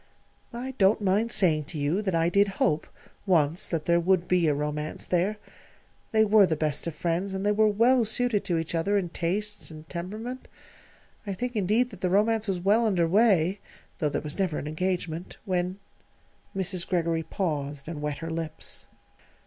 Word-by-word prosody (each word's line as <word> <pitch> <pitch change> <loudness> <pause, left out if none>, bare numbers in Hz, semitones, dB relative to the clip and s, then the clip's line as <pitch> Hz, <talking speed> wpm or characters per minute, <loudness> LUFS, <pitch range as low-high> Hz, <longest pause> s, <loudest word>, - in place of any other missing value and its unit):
"I 255 +2 -4
don't 195 +2 +4
mind 210 +3 +1
saying 155 -8 +2
to 155 - -6
you 150 +7 0
that 190 -4 -1
I 165 0 +3
did 200 +4 +4
hope, 155 0 +1 0.4
once, 165 -2 +2
that 165 -3 -2
there 170 0 +3
would 180 0 +2
be 180 -2 +3
a 150 - +3
romance 150 +1 -3
there. 185 +4 0 0.7
They 220 -1 +4
were 205 -2 +6
the 160 - 0
best 150 0 -1
of 165 - -4
friends, 175 +4 -1
and 190 +1 -3
they 205 - +3
were 215 +1 +4
well 235 +4 +4
suited 220 -1 +1
to 175 -4 0
each 165 0 -3
other 195 +5 +1
in 185 -3 -1
tastes 205 +6 -3
and 155 -1 -11
temperament. 215 +10 -6 0.8
I 195 - -2
think, 245 +4 -4
indeed, 215 +5 +2
that 200 -4 -12
the 185 - +1
romance 215 +3 +2
was 190 -2 -1
well 210 +5 +3
under 175 -5 +2
way 195 -1 +3 0.4
(though 155 -4 +1
there - - -2
was 150 +4 -5
never 185 -6 0
an - - -4
engagement) 175 +1 -3
when 180 -1 -1 0.4
" - - -36
Mrs. 185 -2 -1
Greggory 170 -2 0
paused 145 -6 -3
and 160 -2 -5
wet 150 -1 -2
her 165 - -4
lips. 160 -1 -6
180 Hz, 190 wpm, -27 LUFS, 165-205 Hz, 0.8 s, were